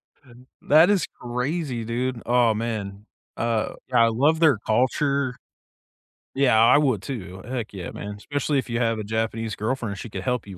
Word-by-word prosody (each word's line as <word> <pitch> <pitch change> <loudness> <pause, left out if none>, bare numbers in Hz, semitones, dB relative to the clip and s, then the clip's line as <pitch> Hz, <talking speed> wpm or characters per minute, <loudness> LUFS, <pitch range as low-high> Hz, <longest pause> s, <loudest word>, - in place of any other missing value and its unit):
H - - -38
n 125 +2 -17
that 160 +5 +5
is 200 -5 +2 0.2
crazy, 125 +1 -2
dude. 120 +1 -2
Aw, 120 -2 +3
man. 105 -3 -4 0.3
Uh, 115 -2 -1 0.2
yeah, 120 -3 +5
I - - +3
love 145 +8 +2
their 155 -7 +5
culture. 130 +4 0 1.0
Yeah, 130 -5 +4
I 115 +5 +6
would 130 -9 +2
too, 95 -6 -7
heck 120 -3 -4
yeah, 95 -4 -6
man; 105 0 -7
especially 145 +6 -1
if 130 - -5
you 115 0 -1
have 115 -2 0
a - - -3
Japanese 110 0 -2
girlfriend, 110 -2 -3
she 115 - -7
could - - -6
help 125 -3 -1
you 95 -2 -9
120 Hz, 180 wpm, -24 LUFS, 110-130 Hz, 1.0 s, I